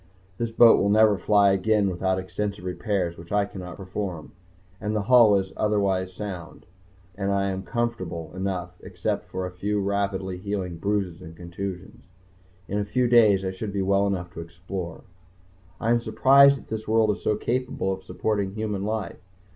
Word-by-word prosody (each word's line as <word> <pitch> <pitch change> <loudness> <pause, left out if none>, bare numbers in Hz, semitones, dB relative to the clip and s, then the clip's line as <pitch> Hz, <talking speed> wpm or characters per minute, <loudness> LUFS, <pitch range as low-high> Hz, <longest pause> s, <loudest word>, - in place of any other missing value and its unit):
This 115 - -1
boat 115 0 +6
will 100 - +2
never 110 0 +5
fly 100 -1 +4
again 100 +2 +2
without 95 0 0
extensive 95 +1 -4
repairs 90 -2 -2
which 85 0 -12
I 105 0 +2
cannot 90 -3 -9
perform. 95 -4 -5 0.5
But 105 +1 -3
the 105 -1 0
hull 115 -2 +6
is 95 -1 -3
otherwise 100 -3 0
sound, 90 -3 -8 0.5
and 100 0 -2
I 100 0 +1
am 95 0 -4
comfortable 95 -9 -3
enough 95 -2 -3
except - - -4
for 95 - -3
a 90 - -5
few 100 +3 -2
rapidly 100 -2 -2
healing 95 -3 -4
bruises 95 -2 -2
and 80 -2 -11
contusions. 90 +2 -7 0.6
In 100 - -2
a - - 0
few 120 +5 0
days 110 -5 +5
I 95 - -1
should 100 +2 -6
be 100 -1 0
well 100 +1 +2
enough 90 -3 -3
to - - -8
explore.... 90 +1 -7 0.8
I 115 - 0
am 120 0 +3
surprised 135 +5 +6
that - - -15
this 110 0 -5
world 110 -1 +3
is 105 - -5
so 105 - +1
capable 120 -4 -1
of 95 - -7
supporting 100 -1 -2
human 105 -3 -3
life. 110 -1 -3
100 Hz, 175 wpm, -25 LUFS, 95-105 Hz, 0.8 s, boat